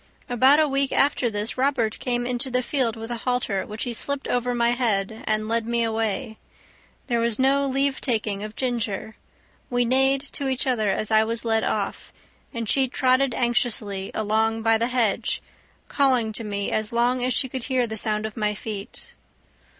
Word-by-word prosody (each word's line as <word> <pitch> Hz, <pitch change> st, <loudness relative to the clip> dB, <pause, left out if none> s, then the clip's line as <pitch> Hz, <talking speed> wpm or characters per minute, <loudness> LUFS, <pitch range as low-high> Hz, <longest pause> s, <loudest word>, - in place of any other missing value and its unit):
About 260 Hz, +5 st, +4 dB
a 310 Hz, -, +4 dB
week 275 Hz, -1 st, +1 dB
after 275 Hz, -3 st, +2 dB
this 210 Hz, +3 st, -2 dB
Robert 255 Hz, -5 st, 0 dB
came 245 Hz, -1 st, -1 dB
into 250 Hz, +1 st, +1 dB
the 250 Hz, 0 st, 0 dB
field 245 Hz, -3 st, 0 dB
with 225 Hz, +1 st, -7 dB
a 240 Hz, -, -2 dB
halter, 235 Hz, -5 st, -1 dB
which 215 Hz, +2 st, -5 dB
he 245 Hz, -, -3 dB
slipped 280 Hz, +4 st, -1 dB
over 245 Hz, 0 st, 0 dB
my 235 Hz, 0 st, +3 dB
head, 220 Hz, -3 st, 0 dB
and 215 Hz, 0 st, +1 dB
led 230 Hz, 0 st, 0 dB
me 235 Hz, 0 st, +1 dB
away. 220 Hz, 0 st, -2 dB, 0.7 s
There 240 Hz, -3 st, 0 dB
was 230 Hz, -1 st, 0 dB
no 275 Hz, +1 st, +2 dB
leave 275 Hz, 0 st, 0 dB
taking 215 Hz, -5 st, 0 dB
of 215 Hz, 0 st, -7 dB
Ginger; 230 Hz, -4 st, -3 dB, 0.5 s
we 245 Hz, 0 st, +1 dB
neighed 265 Hz, +2 st, +3 dB
to 280 Hz, -, -3 dB
each 260 Hz, -1 st, 0 dB
other 230 Hz, -6 st, +1 dB
as 215 Hz, +3 st, -2 dB
I 220 Hz, 0 st, +5 dB
was 230 Hz, +1 st, -2 dB
led 225 Hz, -1 st, +1 dB
off, -, -, -3 dB, 0.4 s
and 230 Hz, -1 st, -4 dB
she 265 Hz, +4 st, +2 dB
trotted 255 Hz, 0 st, +2 dB
anxiously 225 Hz, -5 st, 0 dB
along 220 Hz, +1 st, 0 dB
by 225 Hz, 0 st, +3 dB
the 230 Hz, -, +1 dB
hedge, 235 Hz, -3 st, 0 dB, 0.5 s
calling 255 Hz, -6 st, +2 dB
to 225 Hz, -, -5 dB
me 200 Hz, -1 st, -3 dB
as 215 Hz, -1 st, -1 dB
long 245 Hz, +2 st, +1 dB
as 255 Hz, -, +1 dB
she 260 Hz, +2 st, +1 dB
could 255 Hz, -1 st, -5 dB
hear 260 Hz, -3 st, +1 dB
the 220 Hz, -1 st, -5 dB
sound 215 Hz, 0 st, -1 dB
of 220 Hz, -, -6 dB
my 210 Hz, -2 st, -1 dB
feet. 210 Hz, +1 st, -7 dB
235 Hz, 190 wpm, -24 LUFS, 220-255 Hz, 0.7 s, I